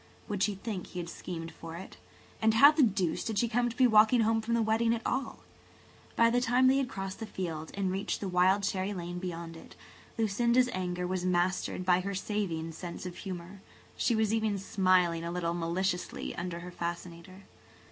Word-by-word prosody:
Would 205 -2 -3
she 205 -1 +2
think 195 -2 -5
he 180 - -7
had 170 -1 -5
schemed 165 -2 -6
for 165 0 -9
it? 190 - -10 0.4
And 220 0 +3
how 280 +6 +9
the 305 0 +2
deuce 195 - +1
did 220 -3 -3
she 235 - +2
come 240 +1 +1
to 235 - -8
be 260 - +5
walking 220 +1 +6
home 225 0 +2
from 230 +1 -1
the 230 - +2
wedding 225 +1 +2
at 230 - -7
all? 260 +2 -2 0.7
By 230 0 +5
the 245 +1 +2
time 250 +2 +3
they 260 +1 +5
had 270 -3 0
crossed 195 -1 -5
the 225 - -5
field 165 -6 -5
and 195 -2 -1
reached 195 +2 -2
the 200 - -3
wild 185 +2 +3
cherry 195 0 -1
lane 175 0 -5
beyond 170 -2 -6
it, 165 - -13 0.4
Lucinda's 235 +3 +2
anger 180 -1 -2
was 180 0 -2
mastered 180 0 0
by 180 0 +4
her 200 +2 -3
saving 185 -5 -2
sense 170 +2 -7
of 180 -1 -6
humour. 185 0 -7 0.3
She 235 - +1
was 220 -1 +1
even 220 -2 +1
smiling 185 -3 +2
a 170 - -3
little 170 -1 -1
maliciously 175 +2 -2
under 175 -1 -4
her 180 +1 -8
fascinator. 175 +2 -6
190 Hz, 200 wpm, -30 LUFS, 175-220 Hz, 0.7 s, how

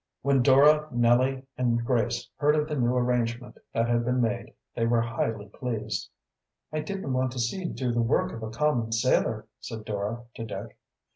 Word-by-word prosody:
When 140 -2 +3
Dora, 145 +4 +6
Nellie, 125 +3 +2
and 120 -2 +1
Grace 120 -2 0
heard 150 +1 +3
of 150 0 +1
the 155 - -4
new 125 -2 +1
arrangement 125 -1 -1
that 115 0 +1
had 120 0 +2
been 125 +1 +1
made 120 0 -1 0.2
they 115 -1 +1
were 115 0 +3
highly 115 -2 -2
pleased. 115 0 -4 0.6
"I 155 - 0
didn't 155 -3 -3
want 130 0 +1
to 130 - -5
see 120 +11 -1
you 185 - -5
do 125 -2 -2
the 120 0 +1
work 115 - +1
of 115 - -7
a 110 - -4
common 120 -2 0
sailor," 110 - +1
said 110 -1 -7
Dora 105 +3 -3
to 115 - -6
Dick. 115 - -7
120 Hz, 190 wpm, -27 LUFS, 115-130 Hz, 0.6 s, Dora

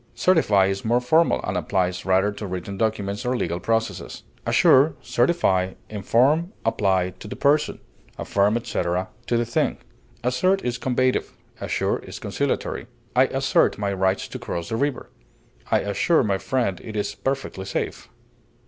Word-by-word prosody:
Certify 110 - +4
is 95 0 -2
more 120 +2 +2
formal, 160 +7 +3
and - - -2
applies 90 -1 -1
rather 95 +2 +3
to 105 0 -6
written 95 +2 -5
documents 105 0 -1
or 125 0 0
legal 85 -5 -2
processes. 115 +4 -2 0.2
Assure, 140 +4 +5
certify, 95 - +1 0.2
inform, 135 - +2
apply 95 -4 +1
to - - -9
the - - -6
person; 150 +1 +2 0.4
affirm, 100 +3 +1
etc., 90 -5 -2 0.2
to 120 - +1
the 120 - +1
thing. 120 - 0 0.5
Assert 185 +11 +1
is 125 0 -2
combative; 130 0 0 0.3
assure - - -1
is - - -9
conciliatory. - - -2 0.3
I - - +6
assert - - +2
my 100 -1 -1
right 95 0 +2
to - - -7
cross 85 -1 -4
the 110 - -1
river; 140 +2 -2 0.6
I - - +3
assure 135 - +2
my 100 -3 0
friend 100 -1 -1
it 110 - -8
is 105 -1 -1
perfectly 105 -2 -3
safe. - - -4
110 Hz, 150 wpm, -23 LUFS, 95-130 Hz, 0.6 s, I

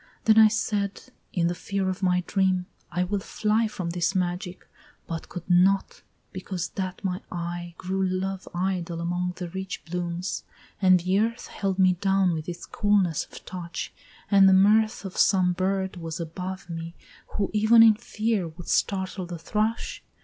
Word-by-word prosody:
Then 220 0 +6
I 220 - +9
said, 205 -2 -1 0.3
in 175 -2 0
the 175 - +1
fear 195 +2 -2
of 185 +1 -2
my 180 -1 +2
dream, 185 -2 +1 0.3
I 180 +1 0
will 200 +2 -1
fly 215 +3 0
From 180 -5 -4
this 175 +3 0
magic, 180 0 -2 0.4
but 165 -1 -6
could 175 -2 -7
not, 190 +2 +3 0.3
because 185 -2 -4
that 185 0 -5
my 185 -1 -2
eye 175 0 -5
Grew 190 +1 -2
love 190 +1 -2
idle 175 -2 -2
among 175 +1 -1
the 180 -2 -5
rich 190 +2 -6
blooms; 175 +1 -3 0.4
and 185 -1 +6
the 185 +3 +2
earth 230 +2 -1
Held 195 -2 -2
me 185 -1 +5
down 190 0 +2
with 160 +1 -4
its 175 0 -6
coolness 200 -6 +1
of - - -13
touch, 170 -2 -6 0.4
and 195 -1 +7
the - - +6
mirth 210 +3 +4
Of 190 - -7
some 185 -2 +4
bird 190 +1 -1
was 165 -1 -5
above 180 +3 -5
me, 165 0 -6 0.4
who, 200 -2 -1
even 220 +2 +6
in 225 -1 +8
fear, 215 -3 -1
Would 165 +2 -10
startle 190 -2 0
the 175 -1 -6
thrush? 215 +7 -2
185 Hz, 170 wpm, -26 LUFS, 175-195 Hz, 0.4 s, I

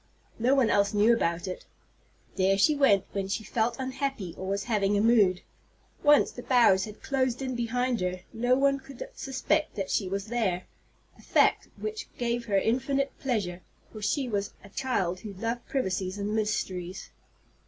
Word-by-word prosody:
No 250 +4 +3
one 260 -5 +3
else 200 +1 +2
knew 215 +3 +5
about 170 -5 0
it. 185 - -6 0.7
There 195 +1 +3
she 300 +10 +4
went 245 -9 +4
when 195 -1 -2
she 195 +3 -2
felt 230 +2 0
unhappy 260 - -3
or 190 - -6
was 200 +1 -1
having 205 -3 +1
a - - +2
mood. 205 -5 +4 0.6
Once 295 -1 +5
the 245 - -8
boughs 235 -7 +4
had 210 -1 -11
closed 260 -3 0
in 260 -1 -3
behind 245 -1 -1
her, 180 0 -2
no 245 +2 +2
one 275 +1 +2
could 270 -1 -9
suspect 275 +4 -1
that 195 -3 -3
she 195 -3 0
was 195 +1 -2
there, 210 -6 -1 0.5
a - - -14
fact - - +3
which 435 +1 -5
gave 240 -1 -1
her 200 -3 +1
infinite 270 +6 +1
pleasure, 200 -9 -2 0.3
for 215 - -9
she 260 +6 0
was 205 -3 -2
a 200 - -13
child 195 -7 -1
who 205 +1 -8
loved 230 +5 -4
privacies 190 -6 -2
and 205 +1 -2
mysteries. 190 -4 -2
220 Hz, 175 wpm, -28 LUFS, 195-255 Hz, 0.7 s, knew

